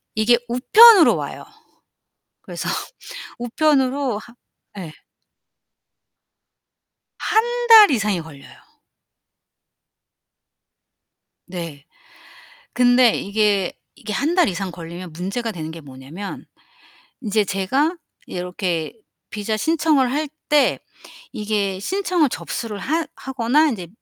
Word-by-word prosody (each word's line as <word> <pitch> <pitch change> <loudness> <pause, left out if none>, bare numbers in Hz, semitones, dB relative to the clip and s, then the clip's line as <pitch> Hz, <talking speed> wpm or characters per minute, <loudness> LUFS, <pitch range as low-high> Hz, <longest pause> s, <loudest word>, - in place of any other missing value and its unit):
이게 220 +3 +4
우편으로 395 - +7
와요. - - -6 1.0
그래서 - - -6 0.7
우편으로 265 -1 0
하 235 +2 -14 0.4
예. 165 -4 -8 2.3
1 480 +2 0
달 440 -3 +9
이상이 210 - 0
걸려요. 145 -3 -14 3.0
네. 165 -5 -7 0.9
근데 245 -1 +4
이게, 200 -2 0 0.2
이게 215 -6 -7
1 300 - -1
달 360 - +4
이상 190 0 -3
걸리면 170 +1 -9
문제가 200 +8 -4
되는 160 -5 -7
게 165 0 -10
뭐냐면 140 +8 -9 0.8
인제 215 -3 +1
제가 270 - 0 0.3
이렇게 180 -3 -4 0.4
비자 215 +1 -3
신청을 305 -2 +1
할 300 +3 -1 0.2
때 295 -2 +3 0.6
이게 205 -3 -2
신청을 360 - 0
접수를 225 -3 -5
하 315 +10 -2
하거나 265 +4 +1
인제 190 -10 -5
220 Hz, 185 characters per minute, -20 LUFS, 185-290 Hz, 3.0 s, 달